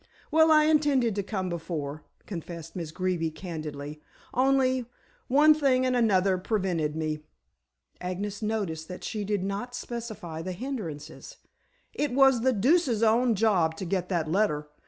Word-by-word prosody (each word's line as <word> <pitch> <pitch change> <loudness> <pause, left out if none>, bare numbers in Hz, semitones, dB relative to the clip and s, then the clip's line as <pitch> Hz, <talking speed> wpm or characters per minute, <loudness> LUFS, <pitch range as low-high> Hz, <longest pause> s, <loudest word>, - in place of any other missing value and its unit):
"Well, 320 +1 +5
I 305 -1 +7
intended 290 -7 +3
to 200 - -1
come 190 -2 -3
before," 160 -4 -4 0.2
confessed 165 -3 -7
Miss 170 -4 -4
Greeby 180 -2 -1
candidly. 155 -3 -7 0.3
"Only, 260 -1 +2 0.4
one 300 +4 +6
thing 270 -4 +2
and 255 -1 +1
another 195 -5 +3
prevented 180 -7 -1
me!" 155 -1 -2 0.8
Agnes 195 +3 -4
noticed 200 -8 -2
that 180 - -8
she 215 -2 -3
did 205 -2 -1
not 205 +6 -4
specify 215 -9 -6
the 185 +2 -4
hindrances. 175 - -6 0.6
"It 290 -4 -1
was 270 -2 +5
the 260 +2 +3
deuce's 245 - +2
own 230 +1 +4
job 190 -7 +2
to 190 - -4
get 180 0 -1
that 170 -4 0
letter. 155 -4 0
200 Hz, 145 wpm, -27 LUFS, 165-245 Hz, 0.8 s, I